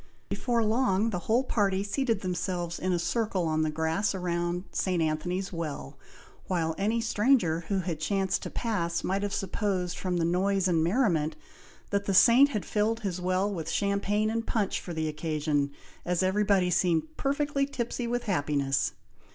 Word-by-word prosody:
Before 235 -2 0
long 220 -1 +2
the 180 - -2
whole 240 +4 +4
party 200 -6 +1
seated 225 0 0
themselves 180 -2 -2
in 185 - -1
a 175 - +2
circle 190 +1 0
on 155 -1 +1
the 155 - +1
grass 160 +6 0
round 175 -1 -1
St. 185 -2 0
Anthony's 175 +5 -1
Well, 155 - -5 0.5
while 165 -3 0
any 220 +4 +1
stranger 210 -7 +2
who 195 -2 0
had 170 -3 -3
chanced 195 +3 0
to - - -5
pass 170 -8 -2
might 195 +2 0
have 205 0 -2
supposed, 190 -3 -2
from 180 -2 -1
the 165 - +1
noise 190 +2 +1
and 165 -3 +2
merriment, 170 - +1 0.6
that 200 0 0
the 195 - 0
Saint 255 +8 +7
had 210 -8 -3
filled 220 +2 0
his 185 -3 -3
well 185 +3 0
with 165 -4 -4
champagne 205 +1 +1
and 230 0 -2
punch 210 -4 0
for 180 - -7
the 160 -1 -2
occasion, 150 -2 -1 0.3
as 180 +1 0
everybody 190 -1 +2
seemed 160 -3 +1
perfectly 280 0 0
tipsy 245 -2 -3
with 245 +1 -1
happiness. 145 - 0
185 Hz, 170 wpm, -28 LUFS, 170-210 Hz, 0.6 s, Saint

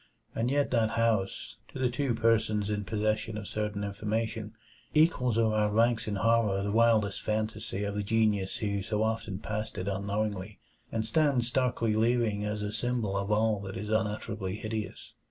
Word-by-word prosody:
And 115 +2 0
yet 145 +1 +1
that 115 -3 +3
house, 110 -1 0
to - - -10
the 130 -2 +1
two 130 -2 0
persons 110 -2 +2
in 105 -1 -2
possession 110 +1 -1
of 105 -2 -6
certain 105 -1 -2
information, 110 +1 -3 0.4
equals 130 -7 +3
or 110 -1 +3
outranks 110 +2 +2
in 105 - -1
horror 105 -1 +2
the 100 - -1
wildest 110 -2 +3
fantasy 110 -1 -2
of 100 0 -2
the 105 - -1
genius 105 -2 +1
who 100 -2 -1
so 105 +2 -1
often 110 -3 -2
passed 110 +2 -4
it 90 - -3
unknowingly, 100 0 -2 0.3
and 110 -1 -1
stands 130 -1 +2
starkly 125 -3 +1
leering 110 -2 +2
as 105 0 -2
a 105 0 -3
symbol 115 -3 -1
of 100 +1 -1
all 110 0 +2
that 95 -1 -6
is 105 +2 -5
unutterably 105 -2 -1
hideous. 110 0 -5
110 Hz, 170 wpm, -29 LUFS, 105-115 Hz, 0.4 s, that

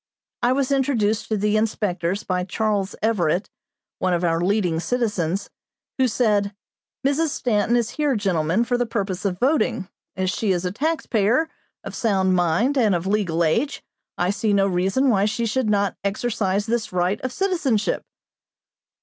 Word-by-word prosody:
I 240 +1 +3
was 275 0 0
introduced 225 -6 +1
to 215 - 0
the 210 +1 +1
inspectors 200 -3 -1
by 180 -1 -1
Charles 205 0 -1
Everett, 190 -4 +1 0.5
one 185 -1 +1
of 175 - -2
our 165 -1 +1
leading 180 -3 +1
citizens, 200 -5 -1 0.5
who 260 - +4
said: 210 -4 +1 0.5
"Mrs. 290 +4 +2
Stanton 235 -5 +1
is 235 -1 0
here, 295 -3 0
gentlemen, 185 -1 +1
for 245 0 0
the 245 - 0
purpose 200 -4 -3
of 185 -2 0
voting. 250 - +1 0.3
As 185 0 0
she 205 0 0
is 175 0 -2
a 180 - -1
taxpayer, 260 - +1 0.3
of - - -7
sound 190 -4 +1
mind, 180 - +2
and 215 -6 +3
of 170 +1 -2
legal 190 -5 +1
age, 230 - 0 0.3
I 180 +2 +1
see 210 0 0
no 195 -1 +4
reason 195 +8 +1
why 205 -5 +3
she 215 +2 -1
should 230 0 0
not 200 -1 +1
exercise 205 -1 -1
this 230 0 -1
right 180 +3 0
of 255 - -3
citizenship." 290 - 0
210 Hz, 160 wpm, -23 LUFS, 185-240 Hz, 0.5 s, who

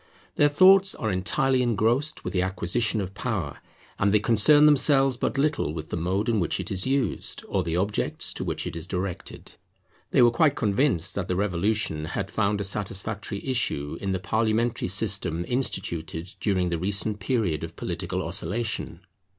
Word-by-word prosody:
Their 145 - +4
thoughts 190 +5 +5
are 110 -3 -2
entirely 130 +8 +1
engrossed 120 +5 0
with - - -4
the 90 - +1
acquisition 100 +4 0
of 95 0 -6
power; 100 - -4 0.4
and 100 +1 +2
they 105 - +4
concern 120 +8 +5
themselves 135 -2 +4
but 130 - -2
little 145 - 0
with 80 -1 -7
the - - -1
mode 95 +6 -1
in 115 -3 +1
which 85 - -1
it - - -5
is 95 +3 +1
used, 135 -5 -1
or 95 - 0
the 85 +1 -2
objects 100 +3 0
to - - -4
which - - -3
it - - -5
is 85 +1 -4
directed. 90 -1 -5 0.6
They - - +4
were 120 - +6
quite 150 +1 +2
convinced 100 - +1
that 95 -2 -3
the 90 - -1
Revolution 95 -4 0
had 95 +4 -4
found 105 -1 0
a - - -2
satisfactory 100 +1 -4
issue 120 - -1
in 100 - -2
the 95 - 0
parliamentary 110 +4 0
system 95 -4 +1
instituted 85 -8 -3
during 95 -4 0
the 85 -1 -2
recent 100 +3 0
period 100 - -1
of - - -7
political - - -4
oscillation. 110 -6 -3
105 Hz, 175 wpm, -25 LUFS, 90-120 Hz, 0.6 s, were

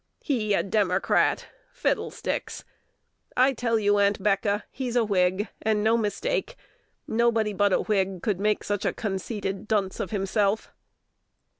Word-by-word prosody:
He 215 -7 +1
a - - +1
Democrat! 195 -2 +1 0.3
Fiddlesticks! - - -2 0.7
I 260 +2 +5
tell 230 -2 0
you, 205 -1 +2
Aunt'Becca, 200 +1 +1
he's 250 -2 -4
a 240 -2 +3
Whig, 190 0 +1
and 215 -1 +1
no 220 +1 +4
mistake: 235 - -1 0.5
nobody 225 -2 +1
but 205 0 +2
a - - +3
Whig 195 -4 -1
could 205 -5 0
make 210 +1 +1
such 205 -1 -2
a - - 0
conceity 200 -1 -3
dunce 200 -1 -2
of - - -2
himself." 205 +1 0
210 Hz, 135 wpm, -26 LUFS, 195-225 Hz, 0.7 s, I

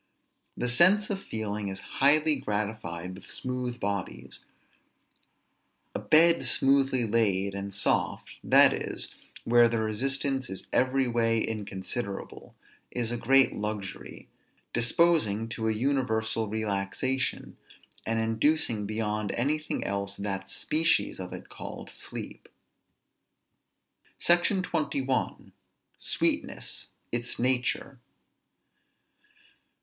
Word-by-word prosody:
The 125 - -1
sense 185 - +4
of 195 -1 -2
feeling 105 -2 -4
is 95 0 -5 0.2
highly 150 +2 +5
gratified 105 -7 -3
with 95 - -12
smooth 125 -1 -4
bodies. 65 -10 -4 1.5
A - - -2
bed 165 +2 +5
smoothly 135 -2 +4
laid, 100 -3 +1
and 100 0 -5
soft, 100 +1 0
that - - +6
is, - - -3 0.3
where 120 0 +5
the 115 0 0
resistance 135 +4 -1
is 95 - -5
every 130 +1 +2
way 115 -1 +2
inconsiderable, 105 0 -5 0.3
is 120 -2 -2
a - - -1
great 135 +3 +4
luxury, 105 -2 -5 0.5
disposing 120 -4 +2
to 110 -1 -3
an 110 -1 0
universal 110 -4 0
relaxation, 110 +4 -2 0.5
and 115 0 -1
inducing 115 -1 +1
beyond 105 -1 -1
anything 150 +5 -1
else 100 0 -2
that 95 -1 -4
species 160 +2 +2
of - - -6
it - - -8
called - - -8
sleep. - - -8 1.7
SECTION 175 +2 +3
XXI. 135 -6 -2 0.5
SWEETNESS, - - -1 0.2
ITS 120 0 -2
NATURE. 125 +1 0
115 Hz, 100 wpm, -28 LUFS, 105-135 Hz, 1.7 s, that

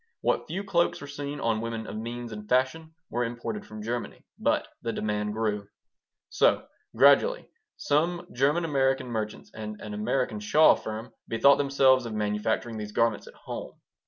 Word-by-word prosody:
What - - 0
few 185 +5 -3
cloaks 175 -3 +1
were - - -8
seen 145 0 -5
on 115 -3 0
women 115 -1 -4
of - - -7
means 120 +2 -5
and 105 -1 -8
fashion 145 +6 +1 0.2
were 120 +1 0
imported 120 - -4
from 110 0 -8
Germany. 120 +2 -4
But - - +1
the 115 - -2
demand 105 -1 -2
grew. 105 -2 -1 0.6
So, - - +3 0.3
gradually, - - +5 0.3
some 170 +4 +1
German 145 +7 +2
American 135 -4 +1
merchants 110 -2 -4
and 105 -1 -6
an 105 - -7
American 110 +2 -1
shawl 150 +9 +6
firm 110 +2 -6
bethought 140 +5 +5
themselves 135 -3 +4
of 110 - -5
manufacturing 105 +2 -1
these 105 0 -6
garments 115 -2 +1
at - - -13
home. - - -7
115 Hz, 160 wpm, -27 LUFS, 110-140 Hz, 0.6 s, shawl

